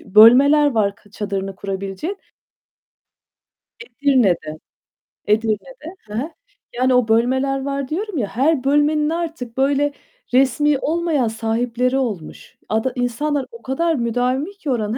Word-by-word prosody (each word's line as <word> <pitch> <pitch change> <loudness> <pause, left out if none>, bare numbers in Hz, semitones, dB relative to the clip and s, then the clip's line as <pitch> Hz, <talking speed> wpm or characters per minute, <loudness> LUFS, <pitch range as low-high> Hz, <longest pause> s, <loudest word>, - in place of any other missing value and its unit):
bölmeler 265 +9 +6
var 205 -4 +1
kı 205 - -24
çadırını 195 -2 -4
kurabilecek. 195 - -5 1.6
Edirne'de, 240 - 0 0.7
Edirne'de. 225 - -1
Hı 210 - -10
hı. 260 +9 -2 0.5
Yani 255 +1 +2
o 250 -2 +3
bölmeler 260 +4 +1
var, 275 -1 -3
diyorum 385 +3 -3
ya. 215 -5 -1
Her 270 +4 +1
bölmenin 295 +2 +2
artık 320 -8 -4
böyle 280 +2 +2 0.4
resmî 270 +2 +3
olmayan 315 -5 0
sahipleri 235 +3 -1
olmuş. 210 - -5
Ada 220 +4 0
insanlar 260 +4 -1
o 465 - -12
kadar 325 +5 0
müdavimi 250 - -1
ki 390 -8 -7
oranın 225 -1 -1
255 Hz, 120 wpm, -20 LUFS, 225-295 Hz, 1.6 s, bölmeler